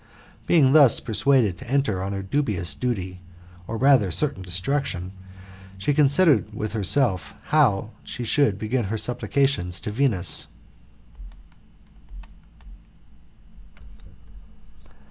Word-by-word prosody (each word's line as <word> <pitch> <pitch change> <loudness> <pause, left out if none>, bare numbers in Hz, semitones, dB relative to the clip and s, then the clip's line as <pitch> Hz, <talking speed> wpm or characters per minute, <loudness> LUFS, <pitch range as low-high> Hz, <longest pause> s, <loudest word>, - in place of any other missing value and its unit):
Being 140 -6 +4
thus 145 -7 +6
prepared 115 -5 +1
to - - -11
enter 135 -9 0
on 95 +1 -4
her 100 -1 -4
dubious 95 - -2
duty, 95 -7 -4 0.5
or 115 - -4
rather 130 -6 +3
certain 95 - 0
destruction, 95 +1 -3 0.7
she 100 +10 -1
considered 145 - +3
with 110 -1 -5
herself 100 - +1
how 115 -9 +2
she 125 - -7
should 115 -4 +1
begin 110 +3 -2
her 110 +3 -3
supplications 115 -5 0
to 105 - -5
Venus. 105 - -1
110 Hz, 100 wpm, -23 LUFS, 95-140 Hz, 0.7 s, thus